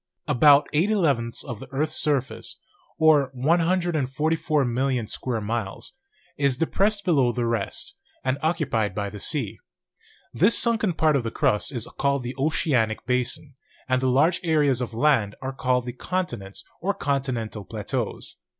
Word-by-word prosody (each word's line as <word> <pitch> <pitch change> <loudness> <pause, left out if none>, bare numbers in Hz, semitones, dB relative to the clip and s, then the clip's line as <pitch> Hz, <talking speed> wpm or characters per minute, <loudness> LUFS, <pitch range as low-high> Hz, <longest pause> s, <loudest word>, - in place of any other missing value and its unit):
About 145 +2 +5
eight 165 +7 +2
elevenths 140 - 0
of 120 -6 -7
the 135 - -9
earth's 155 +3 -1
surface, 140 -3 -1 0.4
or 155 -4 +4
144,000,000 150 -5 +1
square 115 +1 -2
miles, 105 -2 -4 0.4
is 140 -3 +2
de 165 - +1
pressed 200 +4 +1
below 140 -9 +3
the 120 0 -2
rest, 115 -4 -2 0.3
and 130 +2 0
occupied 140 - 0
by 100 -1 -3
the 105 - -8
sea. 110 - -1 0.7
This 200 +8 +5
sunken 220 -5 +2
part 155 -2 +2
of 140 - +2
the 115 - -3
crust 105 +1 0
is 120 -4 -3
called 140 -2 +1
the 125 +1 -4
oceanic 130 -7 0
basin, 125 +3 -1 0.3
and 130 0 +1
the 130 - +2
large 150 +8 +3
areas 150 -6 +2
of 120 -2 -4
land 115 -6 +2
are 135 0 -5
called 125 -1 0
the 125 - -5
continents 120 - -4 0.2
or 200 +2 0
con 140 -1 0
tinental 115 -6 -5
plateaus. - - -4
135 Hz, 150 wpm, -24 LUFS, 120-155 Hz, 0.7 s, About